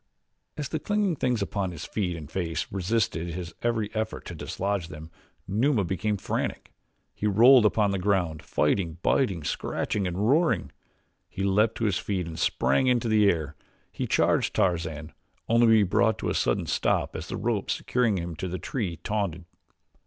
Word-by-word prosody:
As 150 -2 -3
the 160 - -2
clinging 205 -4 0
things 125 -6 0
upon 100 -1 -2
his 85 -4 -7
feet 90 -5 -2
and 75 -3 -8
face 80 -1 -2
resisted 95 -3 -1
his 85 -2 -6
every 115 -3 -1
effort 110 0 -3
to - - -7
dislodge 95 +2 -3
them, 80 -2 -10 0.4
Numa 110 +3 +2
became 100 +4 -1
frantic. - - -3 0.4
He 105 - -2
rolled 115 +3 +7
upon 105 -1 +1
the 100 - -1
ground, 90 -5 0
fighting, 80 +3 0
biting, 95 - +1
scratching, 100 +6 -2
and 90 0 -4
roaring; 110 - +2 0.6
he 95 - -4
leaped 105 +3 +2
to 115 - -2
his 100 -5 +1
feet 95 -4 -2
and 80 -1 -7
sprang 70 - +2
into 120 -2 +2
the 105 -2 +4
air; 75 -4 -1 0.4
he - - -3
charged - - +2
Tarzan, 80 -6 -1 0.3
only 115 +1 +4
to - - +5
be 110 -2 +6
brought 90 - +2
to - - -3
a - - 0
sudden - - 0
stop - - 0
as - - -5
the - - -4
rope - - -1
securing 120 -5 +1
him 85 -1 -4
to 95 - -3
the 90 +1 -3
tree 95 -6 -3
tautened. 100 -5 -2
100 Hz, 175 wpm, -27 LUFS, 85-110 Hz, 0.6 s, rolled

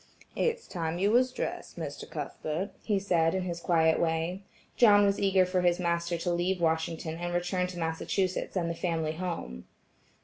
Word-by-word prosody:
"It's 470 0 0
time 165 -2 -3
you 200 +3 +2
was 250 +2 +4
dressed, - - -5
Mr. - - -6
Cuthbert," 170 +6 -4
he 210 -3 0
said 175 -4 +2
in 190 - 0
his 170 -2 -4
quiet 160 -2 +3
way. 165 +3 0 0.3
John 205 -4 +6
was 200 0 +1
eager 195 -2 +4
for 185 0 0
his 175 -1 +3
master 170 0 0
to 175 +1 -1
leave 180 +2 0
Washington 160 0 -1
and 175 0 -3
return 180 +1 0
to 180 -1 -8
Massachusetts 175 +4 -1
and 175 -3 0
the 170 - -1
family 165 -2 -1
home. 160 - -5
175 Hz, 175 wpm, -29 LUFS, 165-190 Hz, 0.3 s, John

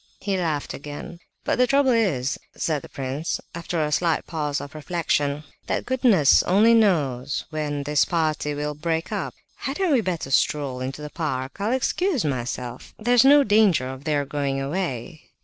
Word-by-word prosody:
He 200 -2 -1
laughed 160 -6 -2
again. 145 +4 -8 0.2
"But - - 0
the 250 - +5
trouble 275 0 +3
is," 170 - +1 0.2
said 155 -3 -1
the - - -12
prince, 135 +4 -3
after 170 0 -3
a 150 - -2
slight 165 +2 +1
pause 150 -3 -2
for 145 - -4
reflection, 150 -2 -1 0.2
"that - - -1
goodness 205 - +4
only 215 +5 +4
knows 145 - +1
when 150 -2 -2
this 145 +1 +3
party 155 -3 -1
will 150 +1 -2
break 160 +2 -2
up. - - -3 0.2
Hadn't 325 +6 -1
we 255 - +4
better 175 -8 -3
stroll 135 -2 +1
into 135 +3 -5
the 150 - -7
park? 135 -5 -3
I'll 210 +3 0
excuse 270 - 0
myself, 125 -2 -4
there's 240 +2 +4
no 285 +1 +7
danger 205 - +3
of 130 +2 -8
their 145 -2 +1
going 140 -1 -2
away." 150 -1 -4
155 Hz, 165 wpm, -24 LUFS, 140-200 Hz, 0.2 s, no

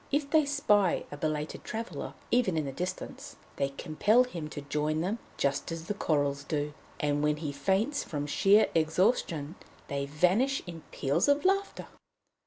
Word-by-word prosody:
If 285 0 0
they 315 -2 +5
spy 210 -10 +2
a 145 - -6
belated 150 0 -3
traveller, 225 +1 -5 0.2
even 230 -9 +2
in 155 - 0
the 135 - -3
distance, 180 +6 -5 0.2
they 140 - +1
compel 205 - +2
him 170 -11 -6
to 145 - -6
join 150 +2 -1
them, 200 +7 -1 0.2
just 140 +3 0
as 165 -1 -5
the 205 - -2
Courils 145 -6 0
do; 150 0 -2 0.3
and 145 0 +1
when 150 0 +2
he 150 -2 -3
faints 195 - 0
from 145 -2 -4
sheer 195 +8 +4
exhaustion 160 - +1 0.4
they 140 0 -2
vanish 185 - +2
in 170 -2 -8
peals 140 - +1
of 285 +4 +3
laughter." 390 +1 +1
165 Hz, 165 wpm, -30 LUFS, 145-215 Hz, 0.4 s, they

